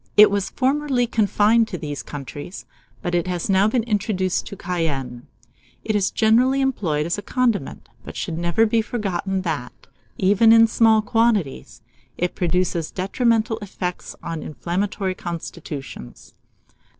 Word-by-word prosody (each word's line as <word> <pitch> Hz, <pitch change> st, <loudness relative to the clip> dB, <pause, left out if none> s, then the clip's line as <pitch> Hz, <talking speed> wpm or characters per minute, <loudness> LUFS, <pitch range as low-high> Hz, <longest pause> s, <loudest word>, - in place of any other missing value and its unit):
It 210 Hz, 0 st, +9 dB
was 200 Hz, -1 st, -1 dB
formerly 270 Hz, -1 st, +1 dB
confined 220 Hz, 0 st, +3 dB
to 185 Hz, -, -5 dB
these 145 Hz, -3 st, -5 dB
countries, 145 Hz, +5 st, -8 dB, 0.4 s
but 175 Hz, -2 st, -2 dB
it 175 Hz, 0 st, +1 dB
has 180 Hz, +1 st, -2 dB
now 195 Hz, +2 st, +4 dB
been 230 Hz, +1 st, +1 dB
introduced 200 Hz, -4 st, -1 dB
to 200 Hz, -, -7 dB
Cayenne. 145 Hz, -10 st, -3 dB, 0.6 s
It 215 Hz, -, -1 dB
is 200 Hz, -2 st, +2 dB
generally 245 Hz, +5 st, +3 dB
employed 180 Hz, -, 0 dB
as 170 Hz, +4 st, -2 dB
a -, -, -5 dB
condiment; 230 Hz, -, -1 dB, 0.2 s
but -, -, -9 dB
it -, -, -7 dB
should 165 Hz, -2 st, -3 dB
never 170 Hz, +6 st, +2 dB
be 225 Hz, +1 st, +2 dB
forgotten, 195 Hz, -4 st, -2 dB
that, 150 Hz, -8 st, -5 dB, 0.3 s
even 205 Hz, +4 st, +4 dB
in 225 Hz, 0 st, +8 dB
small 220 Hz, -1 st, +4 dB
quantities, 210 Hz, -, 0 dB, 0.3 s
it 180 Hz, 0 st, -1 dB
produces 175 Hz, -2 st, 0 dB
detrimental 225 Hz, +3 st, 0 dB
effects 185 Hz, -3 st, -5 dB
on 165 Hz, -2 st, -4 dB
inflammatory 185 Hz, +4 st, -2 dB
constitutions. 155 Hz, -, -8 dB
195 Hz, 140 wpm, -22 LUFS, 170-225 Hz, 0.6 s, It